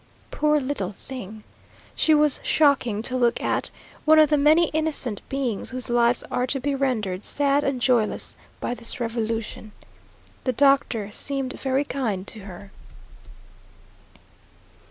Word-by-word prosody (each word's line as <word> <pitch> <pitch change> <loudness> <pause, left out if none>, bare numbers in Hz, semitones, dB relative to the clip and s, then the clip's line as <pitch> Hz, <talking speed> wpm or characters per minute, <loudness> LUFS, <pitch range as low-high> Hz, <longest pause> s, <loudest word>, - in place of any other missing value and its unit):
Poor 300 0 +2
little 260 -9 -3
thing! 215 -1 -9 0.5
she 315 - +3
was 300 -2 +4
shocking 260 -8 +2
to 255 - +1
look 240 -2 +2
at; - - -1 0.3
one 315 0 +5
of 310 -1 +5
the - - +5
many 310 +3 +4
innocent 300 -9 -1
beings 260 -6 -2
whose 255 -1 -3
lives 240 0 +3
are 250 - 0
to 270 +1 -1
be 280 +2 -1
rendered 220 -9 -1
sad 285 0 +2
and 270 -3 -1
joyless 240 -4 +1 0.2
by - - -3
this 235 0 -2
revolution. 225 -2 -4 0.7
The 255 - 0
doctor 260 -6 +2
seemed 270 +3 -2
very 265 +1 -1
kind 220 -10 -3
to 220 - -7
her. 195 0 -11
255 Hz, 135 wpm, -24 LUFS, 225-280 Hz, 0.7 s, one